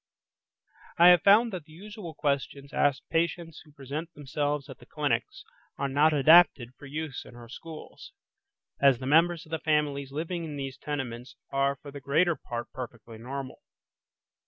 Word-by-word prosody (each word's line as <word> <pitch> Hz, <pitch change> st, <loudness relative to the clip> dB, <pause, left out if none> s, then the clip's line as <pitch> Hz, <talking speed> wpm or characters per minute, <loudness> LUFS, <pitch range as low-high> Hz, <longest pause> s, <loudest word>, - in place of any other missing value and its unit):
I 175 Hz, +1 st, +8 dB
have 175 Hz, -2 st, +7 dB
found 215 Hz, +3 st, +5 dB
that 175 Hz, -5 st, -6 dB
the 155 Hz, -, -17 dB
usual 200 Hz, -1 st, -9 dB
questions 140 Hz, -1 st, -2 dB
asked 140 Hz, -2 st, +1 dB
patients 165 Hz, 0 st, -1 dB
who 150 Hz, -, -20 dB
present 145 Hz, +4 st, -6 dB
themselves 145 Hz, 0 st, -2 dB
at -, -, -11 dB
the -, -, -17 dB
clinics, -, -, -2 dB, 0.3 s
are 140 Hz, -, -1 dB
not 145 Hz, +3 st, +3 dB
adapted 150 Hz, -4 st, +5 dB
for 145 Hz, -, -13 dB
use 150 Hz, -1 st, -5 dB
in 125 Hz, -, -14 dB
our 120 Hz, -1 st, -12 dB
schools, 155 Hz, +6 st, -11 dB, 0.7 s
as 140 Hz, -3 st, +6 dB
the 130 Hz, -, -7 dB
members 165 Hz, +4 st, +3 dB
of 155 Hz, -, -18 dB
the 160 Hz, -, -2 dB
families 145 Hz, -3 st, 0 dB
living 165 Hz, +4 st, -3 dB
in 155 Hz, -2 st, -6 dB
these 135 Hz, -1 st, -6 dB
tenements 130 Hz, -4 st, -5 dB, 0.2 s
are 140 Hz, 0 st, +1 dB
for 140 Hz, +1 st, -12 dB
the 140 Hz, 0 st, -9 dB
greater 160 Hz, +6 st, +2 dB
part 120 Hz, -3 st, -6 dB
perfectly 115 Hz, -3 st, -9 dB
normal. 130 Hz, +2 st, -7 dB
145 Hz, 165 wpm, -28 LUFS, 135-165 Hz, 0.7 s, I